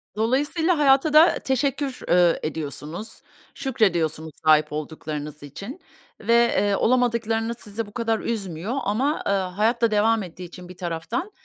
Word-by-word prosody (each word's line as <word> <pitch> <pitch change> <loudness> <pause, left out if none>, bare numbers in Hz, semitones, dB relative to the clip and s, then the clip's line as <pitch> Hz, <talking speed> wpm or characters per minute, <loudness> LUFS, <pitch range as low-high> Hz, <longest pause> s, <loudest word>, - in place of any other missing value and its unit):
Dolayısıyla 290 +10 +1
hayata 285 +1 +4
da 315 +3 +6
teşekkür, 270 0 -1
eee, 175 -1 +4
ediyorsunuz, 155 +6 -6 0.3
şükrediyorsunuz 170 - 0
sahip 155 -1 +5
olduklarınız 150 -1 -6
için 200 - -8 0.4
ve, 230 +2 +1
eee, 235 -4 +3
olamadıklarınız 230 -1 +1
sizi 215 +1 -5
bu 205 - -15
kadar 225 -2 0
üzmüyor 200 -1 -3
ama, 260 +9 0
eee, - - +2
hayat 200 +5 0
da 230 -1 +3
devam 215 0 +2
ettiği 180 +1 -9
için 175 +1 -11
bir 180 - -11
taraftan 175 - -4
215 Hz, 135 wpm, -24 LUFS, 170-245 Hz, 0.4 s, da